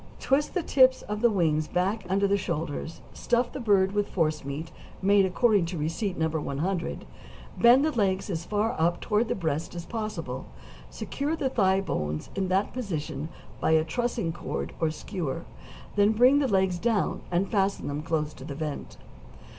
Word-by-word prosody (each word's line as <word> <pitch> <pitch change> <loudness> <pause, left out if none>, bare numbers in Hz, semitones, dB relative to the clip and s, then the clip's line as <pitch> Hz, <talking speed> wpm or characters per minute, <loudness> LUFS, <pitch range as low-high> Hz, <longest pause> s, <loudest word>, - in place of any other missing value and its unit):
Twist 285 +6 +1
the 360 - +1
tips 260 -3 +4
of 210 0 -4
the 235 - +5
wings 155 -6 +1
back 195 +4 -1
under 200 +1 +2
the 200 - +3
shoulders, 165 -4 -3
stuff 240 0 0
the - - -4
bird 200 -5 +3
with 205 0 0
forcemeat 155 -2 -2 0.3
made 200 0 +4
according 205 -2 +3
to 175 0 -4
receipt 165 +6 -2
No. 160 - +2
100; 160 +3 -2 0.5
bend 245 +4 +7
the 315 - +1
legs 195 -7 0
as 165 -2 -3
far 210 +4 0
up 170 +2 +2
toward 215 +2 +1
the - - -1
breast 160 -2 -2
as 170 -1 -5
possible, 175 - -4 0.4
secure 280 - -3
the 280 -5 -1
thigh 190 -5 +3
bones 75 - -3
in 195 -1 -1
that 190 +2 +1
position 155 - -4 0.3
by - - +2
a 160 0 +5
trussing 225 -1 -1
cord 175 - -4
or 160 - +2
skewer; 160 -2 -4 0.5
then 205 +1 +4
bring 250 +6 +5
the 280 - +2
legs 190 -4 +2
down, 225 -2 0
and 180 +2 0
fasten 195 -1 +1
them 145 +1 -3
close 155 -1 -1
to - - -12
the 140 0 -6
vent. 150 -1 -5
190 Hz, 175 wpm, -27 LUFS, 160-215 Hz, 0.5 s, bend